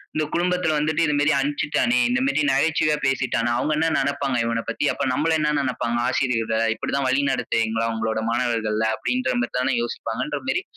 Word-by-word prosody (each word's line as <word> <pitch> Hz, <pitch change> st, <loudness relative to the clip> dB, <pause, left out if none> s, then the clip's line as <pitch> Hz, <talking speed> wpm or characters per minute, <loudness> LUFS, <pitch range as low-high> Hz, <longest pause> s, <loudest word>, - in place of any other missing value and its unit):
இந்த 155 Hz, -, +1 dB
குழும்மத்தில 180 Hz, -1 st, +1 dB
வந்துட்டு 155 Hz, +2 st, 0 dB
இந்த 150 Hz, -, +1 dB
மேரி 150 Hz, +1 st, +3 dB
அனுப்பிச்சுட்டானே, 145 Hz, -, 0 dB
இந்த 250 Hz, -, +1 dB
மேரி 155 Hz, -, +1 dB
நகைச்சுவையா 150 Hz, +2 st, +2 dB
பேசிட்டான். 130 Hz, -3 st, 0 dB
அவங்கள் 150 Hz, +5 st, 0 dB
என்ன 160 Hz, +1 st, +2 dB
நெனப்பாங்க? 140 Hz, -1 st, -1 dB
இவனப் 115 Hz, 0 st, -2 dB
பத்தி, 130 Hz, +5 st, -2 dB
அப்போ -, -, -2 dB
நம்மள 160 Hz, +5 st, +1 dB
என்ன 150 Hz, 0 st, +1 dB
நெனப்பாங்க? 125 Hz, -3 st, -1 dB
ஆசிரியர்கள 115 Hz, -3 st, 0 dB
இப்படித்தான் 135 Hz, +4 st, -2 dB
வழி 135 Hz, +2 st, +2 dB
நடத்துவீங்களா, 115 Hz, -3 st, 0 dB
உங்களுடைய 110 Hz, 0 st, -2 dB
மாணவர்கள 115 Hz, -3 st, 0 dB
அப்படீன்ற 125 Hz, +1 st, -1 dB
மேரி 120 Hz, -, -3 dB
தான 130 Hz, 0 st, +1 dB
யோசிப்பாங்கன்ற 120 Hz, +2 st, -3 dB
மேரி, 380 Hz, +8 st, 0 dB
130 Hz, 165 wpm, -23 LUFS, 115-150 Hz, -, மேரி